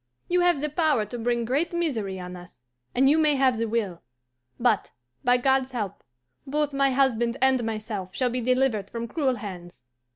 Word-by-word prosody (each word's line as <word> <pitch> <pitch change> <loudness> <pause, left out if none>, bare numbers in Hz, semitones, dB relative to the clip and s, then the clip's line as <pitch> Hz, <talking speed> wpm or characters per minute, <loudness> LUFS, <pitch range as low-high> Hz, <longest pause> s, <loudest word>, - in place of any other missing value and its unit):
You 355 0 +2
have 350 -5 +3
the 300 - -1
power 300 -8 +2
to 240 +4 -7
bring 235 0 0
great 285 +9 0
misery 230 - -2
on 180 0 -7
us, 180 0 -13 0.4
and 265 +2 +4
you 305 +3 +5
may 305 -2 +4
have 260 -4 +2
the 230 - 0
will, 210 -6 -2 0.6
but, 235 -4 +2 0.3
by 245 0 +4
God's 265 +1 +1
help, 210 -6 -4 0.5
both 295 +1 -1
my 275 0 +3
husband 250 -3 +1
and 265 -2 +3
myself 215 -4 -4
shall 250 -2 +1
be 250 +1 -2
delivered 250 -5 +1
from 235 0 -5
cruel 270 -2 0
hands. 180 - -9
245 Hz, 185 wpm, -26 LUFS, 215-275 Hz, 0.6 s, you